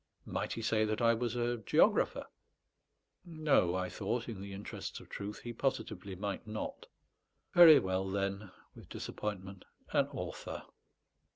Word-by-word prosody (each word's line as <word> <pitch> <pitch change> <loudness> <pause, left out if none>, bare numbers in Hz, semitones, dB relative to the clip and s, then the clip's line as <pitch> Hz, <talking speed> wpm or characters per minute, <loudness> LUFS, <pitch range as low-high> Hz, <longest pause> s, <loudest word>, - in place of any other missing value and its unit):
Might - - -2
he 115 - -5
say 110 0 +2
that 110 0 0
I 115 0 +5
was 120 +1 -2
a 120 0 0
geographer? 110 - +3 1.0
No; 155 - +2
I 90 0 -1
thought, 115 +7 -2
in 110 -5 -6
the 100 0 -7
interests 100 +1 -6
of - - -15
truth, 100 +1 -6
he 120 - -5
positively 110 -7 -2
might 100 +2 -4
not. 110 0 -5 0.7
"Very 170 -3 +10
well, 95 0 0
then" 100 +1 -2 0.2
(with - - -14
disappointment), 95 -2 -5 0.3
"an - - +3
author." - - -6
105 Hz, 145 wpm, -33 LUFS, 95-120 Hz, 1.0 s, Very